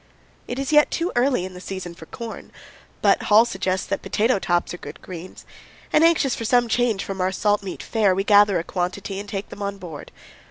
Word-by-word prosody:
It 245 - -4
is 275 +2 -2
yet 300 -1 +6
too 340 +2 -1
early 245 -6 +2
in 185 - -8
the 180 - -10
season 185 -2 -6
for 160 -1 -13
corn, 230 -2 -8 0.5
but - - +4
Hall 215 +2 +7
suggests 190 -4 -2
that - - -3
potato 210 +3 +1
tops 175 -1 0
are 175 - -7
good - - -9
greens, 180 0 -9 0.5
and, 310 - +5
anxious 330 -5 +4
for - - -4
some 240 +1 +3
change 230 -3 +1
from 195 -1 -5
our 185 +1 +1
salt 205 +2 +1
meat 195 -2 -7
fare, 205 -5 +2
we 195 - 0
gather 205 -2 +5
a 165 - -2
quantity 185 +3 -3
and 205 0 -8
take 195 0 -5
them 205 - -10
aboard. 195 -6 -6
200 Hz, 210 wpm, -23 LUFS, 185-235 Hz, 0.5 s, Hall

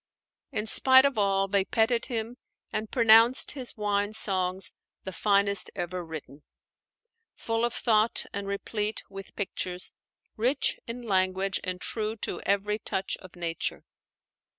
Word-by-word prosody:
In 210 - -2
spite 260 +4 +6
of 275 -6 +1
all, 195 -1 +2
they 195 0 +3
petted 230 +3 +1
him 235 -1 -4 0.3
and 215 0 -3
pronounced 230 +1 +5
his 260 -5 -4
wine 205 0 0
songs 190 -3 -1 0.3
the 190 - -5
finest 200 0 +2
ever 180 +1 -4
written; 155 -3 -9 0.9
full 225 0 -2
of 240 - +1
thought 220 -1 +2
and 200 0 -4
replete 210 +2 -2
with 195 0 -10
pictures, 180 -3 -3 0.4
rich 255 +6 +2
in 240 +1 -6
language 190 -2 +1
and 185 0 -3
true 220 +2 -3
to 220 - -5
every 200 +2 +1
touch 190 -2 -2
of 185 -1 -15
nature. 170 -2 -3
205 Hz, 135 wpm, -28 LUFS, 190-225 Hz, 0.9 s, spite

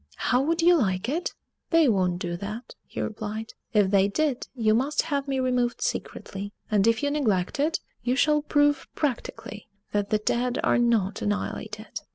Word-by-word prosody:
"How 250 +2 +2
would 330 +4 +1
you 350 0 +6
like 190 - 0
it?" 320 +7 -2 0.3
"They 330 -3 +5
won't 185 -6 +2
do 175 -1 -3
that," 210 +6 -6
he - - -7
replied; 215 +1 -4 0.2
"if 205 -4 +3
they 195 -1 +5
did, 270 +5 -1
you 220 -3 +3
must 270 +6 +1
have 285 -3 -2
me 270 -1 0
removed 250 -2 +1
secretly; 200 +1 -4 0.2
and 210 0 +3
if 230 +4 +2
you 285 - +1
neglect 215 -9 0
it, 315 +4 +1 0.2
you 250 +1 0
shall 300 +2 +3
prove 290 -1 +2
practically 240 -6 -3 0.2
that 205 -1 0
the 215 - +3
dead 245 +4 0
are - - +3
not 225 -5 +1
annihilated!" 215 +1 -3
235 Hz, 175 wpm, -26 LUFS, 205-285 Hz, 0.3 s, you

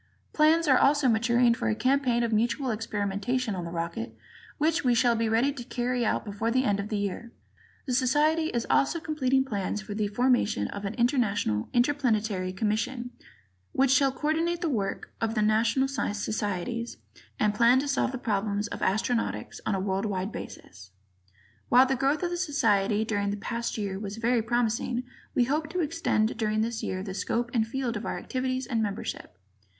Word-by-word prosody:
Plans 320 +2 +4
are 260 -3 +5
also 285 -1 +4
maturing 235 +1 +3
for 235 -1 -2
a 215 - +1
campaign 255 0 +2
of 230 -1 0
mutual 240 +4 +1
experimentation 215 +2 -2
on 180 -2 -4
the - - -5
rocket 165 -10 -4 0.4
which 320 +3 +1
we 245 -2 +3
shall 235 0 +3
be 225 0 0
ready 240 +6 +2
to 255 -3 -7
carry 245 0 -1
out 225 - 0
before 205 +2 -2
the 255 +2 +2
end 205 -5 +1
of 200 +1 -4
this 215 - -1
year. 205 +4 -4 0.5
The 260 - -2
Society 295 +6 +2
is 235 -7 -2
also 325 +4 +2
completing 270 -4 +1
plans 205 -4 -2
for 210 0 -7
the 210 0 -1
formation 245 0 +1
of 200 0 -6
an 200 - -3
International 230 - +1
Interplanetary 220 -8 +1
Commission 225 +5 -2 0.6
which 270 0 +3
shall 270 0 +4
coordinate 325 +5 -1
the 340 - 0
work 200 -5 -3
of 225 0 -1
the 215 - +2
national 230 +5 +2
societies 215 -2 -3 0.4
and 210 -1 +2
plan 235 +4 +5
to 280 +2 0
solve 275 -2 +1
the 260 - -4
problems 205 -2 -1
of - - -6
astronautics 220 +4 -1
on 215 - +1
a - - -1
world 195 +1 -1
wide 195 0 -2
basis. 95 - -9 0.8
While 250 +2 +7
the 265 0 0
growth 275 +5 +1
of 350 - -1
the 350 - -2
Society 220 - +1
during 205 -2 -1
the 205 - -2
past 235 +3 -3
year 195 -2 -3
was 205 0 -6
very 235 +1 +2
promising 240 +1 0 0.3
we 245 - +4
hope 300 +5 -1
to 360 +2 -1
extend 300 -10 0
during 215 -1 0
this 230 0 -2
year 185 0 -3
the 195 -2 -5
scope 235 +5 -2
and 225 -3 +1
field 245 0 -2
of 210 - -4
our - - -2
activities 255 0 -2
and 230 -2 -1
membership. 200 - -4
235 Hz, 185 wpm, -27 LUFS, 210-260 Hz, 0.8 s, While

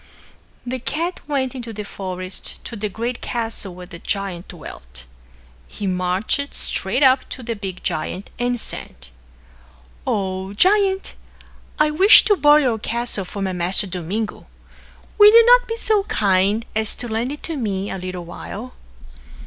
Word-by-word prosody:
The 255 +1 -3
cat 330 +8 -3
went 270 -4 -1
into 240 -3 -6
the 210 0 -5
forest 185 -2 -6
to 235 - -6
the 210 -1 -3
great 235 +4 -4
castle 225 -6 -4
where 180 0 -9
the 175 -2 -11
giant 195 -3 -3
dwelt. - - -11 0.6
He 205 - -7
marched 185 +9 -1
straight 220 +9 0
up 260 0 +4
to 260 - -7
the 230 0 -3
big 195 -3 -7
giant 180 +5 -3
and 245 0 0
said, - - -6 1.1
"O 190 -1 -2
Giant, 385 - +2 0.6
I 300 0 +3
wish 380 +8 +8
to 415 - +4
borrow 295 -1 +6
your 235 -4 +1
castle 235 -3 -2
for 200 +2 -5
my 190 -1 -1
master 180 +3 +2
Domingo. 190 +4 -4 0.7
Will 415 0 +10
you 460 +1 +8
not - - +6
be 455 - -3
so 435 -2 +3
kind 200 - +1
as 220 -1 +3
to 245 - -4
lend 230 +3 -2
it 295 - -8
to 330 - -3
me 200 -6 -2
a 190 - -4
little 180 -1 -6
while?" 215 +7 -8
220 Hz, 155 wpm, -21 LUFS, 190-270 Hz, 1.1 s, Will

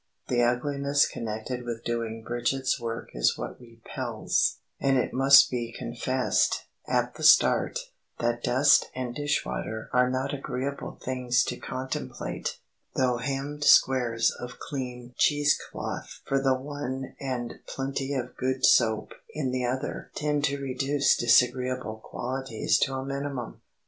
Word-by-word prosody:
The 120 -1 +2
ugliness 140 +4 +2
connected 115 +3 -4
with 120 -1 -5
doing 115 -1 -3
Bridget's 120 +3 0
work 115 -1 -5
is - - +2
what - - -6
repels, 115 -2 -2 0.2
and 135 -1 +3
it 125 - 0
must 135 +1 +7
be 120 -2 -2
confessed, 125 +2 0 0.2
at - - +1
the - - -11
start, - - +5 0.4
that 120 0 -1
dust 135 +4 +4
and 125 -2 -3
dish 145 +3 -1
water 110 0 -5
are 125 0 +4
not 130 +2 -1
agreeable 135 0 -4
things 125 -1 +1
to 125 - -3
contemplate, 130 0 -4 0.4
though 125 -2 +2
hemmed 140 +4 -3
squares 120 -5 +5
of 125 0 -8
clean 125 -3 -6
cheese 145 -1 +4 0.2
cloth - - -6
for 135 0 +1
the 135 -1 +3
one 135 -1 -5
and 125 -3 -4
plenty 135 +1 -3
of 125 -1 -4
good 130 +1 0
soap 110 -3 +3 0.2
in 140 -4 -1
the 125 -1 -1
other 130 +4 -3
tend 150 -1 0
to 140 -1 0
reduce 135 +1 +1
disagreeable 125 -1 +2
qualities 130 -2 -1
to 135 - +1
a 130 0 -3
minimum. 140 -3 -4
130 Hz, 140 wpm, -27 LUFS, 120-135 Hz, 0.4 s, must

